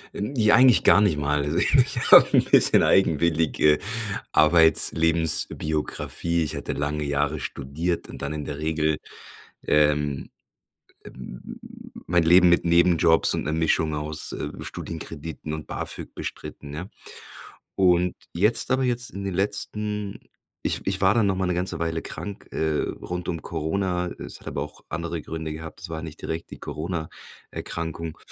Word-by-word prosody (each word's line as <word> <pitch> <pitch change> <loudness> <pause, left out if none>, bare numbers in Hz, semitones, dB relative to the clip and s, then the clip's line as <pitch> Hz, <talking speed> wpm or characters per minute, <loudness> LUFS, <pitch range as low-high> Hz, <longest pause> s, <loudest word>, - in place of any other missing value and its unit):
Ähm, 105 +7 -4
ja, 110 -3 +5
eigentlich 130 -1 +6
gar 100 - +6
nicht 100 -8 +2
mal. 75 0 0
Also 75 +3 -2
ich 130 +5 +2
habe - - +10
'n - - +5
bisschen - - +5
eigenwillige 80 -3 +3 0.5
Arbeits, 80 +1 +5
Lebensbiografie. 80 0 0
Ich 75 - -3
hatte - - -4
lange 75 +1 -2
Jahre 75 +1 -1
studiert 75 +7 -3
und - - -10
dann 70 +2 -3
in 75 -1 -5
der 70 - -6
Regel, 80 0 0 0.7
ähm, 75 -2 +1 0.7
äh, - - -10 1.0
mein 85 0 +2
Leben 90 +2 +6
mit 85 - +3
Nebenjobs 85 -1 +4
und - - -2
'ner 75 - -2
Mischung 80 -1 +1
aus, 75 +1 -3
äh, - - -4
Studienkrediten 80 -1 -6
und 80 -1 -7
Bafög - - -5
bestritten, 70 - -7
ne? 85 +7 -7 0.9
Und 90 -1 +3 0.2
jetzt 105 +7 +2
aber 130 0 +2
jetzt 125 -1 -1
in 100 0 -7
den 95 -2 -3
letzten 105 +1 -3 0.4
ich - - 0
ich 95 0 -1
war 95 +1 +4
dann 115 -3 +3
noch 95 -1 +1
mal 95 0 -1
'ne 90 - 0
ganze 90 -1 -2
Weile 80 0 -2
krank, 100 -1 -7
äh, 80 -1 0
rund 90 0 -5
um 85 -2 -4
Corona, 90 +3 -2
es - - -8
hat - - -19
aber - - -4
auch 75 - -10
andere 85 0 -4
Gründe 80 0 -5
gehabt. 80 0 -9
Es - - -7
war 80 -1 -5
nicht 80 -1 -8
direkt 80 +1 -5
die - - -9
Corona-Erkrankung. 80 0 -6
80 Hz, 155 wpm, -24 LUFS, 75-90 Hz, 1.0 s, habe